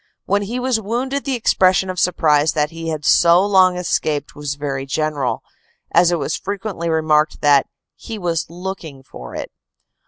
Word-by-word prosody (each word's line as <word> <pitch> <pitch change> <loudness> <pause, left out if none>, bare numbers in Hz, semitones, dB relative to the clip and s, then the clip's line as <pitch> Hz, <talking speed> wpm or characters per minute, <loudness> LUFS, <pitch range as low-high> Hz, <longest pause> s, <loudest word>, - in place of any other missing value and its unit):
When 200 +1 +1
he 230 +5 -4
was 250 -3 0
wounded 260 +6 -2
the 270 -2 -1
expression 190 -5 +2
of 185 -1 -4
surprise 155 -4 +2
that 150 -1 0
he 165 0 -7
had 155 -2 -4
so 170 +3 +5
long 185 -3 +4
escaped 150 -4 -1
was 145 -1 -4
very 140 -2 -4
general, 135 -3 -2 0.5
as 170 0 +4
it 175 - +1
was - - -2
frequently 195 -4 -4
remarked 155 -1 +1
that 145 -2 +4 0.3
he 225 - -8
"was 170 -4 -2
looking 170 -6 -7
for 60 - -11
it." - - -6
170 Hz, 165 wpm, -19 LUFS, 150-195 Hz, 0.5 s, so